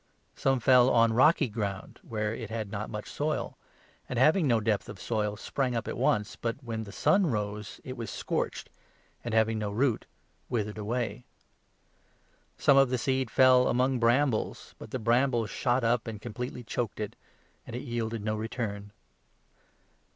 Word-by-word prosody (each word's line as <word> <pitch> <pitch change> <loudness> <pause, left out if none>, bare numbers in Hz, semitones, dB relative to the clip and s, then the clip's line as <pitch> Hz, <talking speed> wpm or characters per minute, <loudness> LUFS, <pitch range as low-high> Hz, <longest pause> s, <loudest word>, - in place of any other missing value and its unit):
Some 135 -1 +1
fell 125 +1 +6
on 115 -2 +4
rocky 145 +4 +5
ground, 105 -4 -4
where 105 -1 -2
5 - - -5
it 115 -3 -6
had 110 -3 -4
not 105 +1 -4
much 105 -1 -6
soil, 150 +1 -2 0.5
and, 125 - -3
having 155 +6 +4
no 120 -3 +3
depth 110 -2 -1
of 105 -2 -9
soil, 105 -2 -1
sprang 125 +2 -2
up 115 - -2
at - - -3
once; 105 -1 +1
but, 115 -1 -2
when 110 -2 -4
the 100 - -9
sun 190 - +3
rose, 105 -4 -3
it 130 - -6
was 115 -4 -5
scorched, - - -3 0.5
and, 115 -2 -2
having 110 0 +3
no 105 -1 -2
6 100 - -6
root, 125 -3 +1 0.4
withered 110 -3 -2
away. 110 +1 -2 1.3
Some 140 - +5
of 135 -2 +6
the 125 - 0
seed 130 0 0
fell 130 0 +5
among 130 +1 +2
brambles; 120 +1 +2
7 - - -16
but - - -9
the 130 - -3
brambles 120 0 +1
shot 125 0 +1
up 115 0 +1
and 110 -2 -5
completely 120 +3 -6
choked 115 -2 -3
it, 105 -1 -4 0.5
and 120 - -6
it 125 - -4
yielded 115 -2 -3
no 110 0 0
return. 105 -2 -4
115 Hz, 175 wpm, -29 LUFS, 105-125 Hz, 1.3 s, fell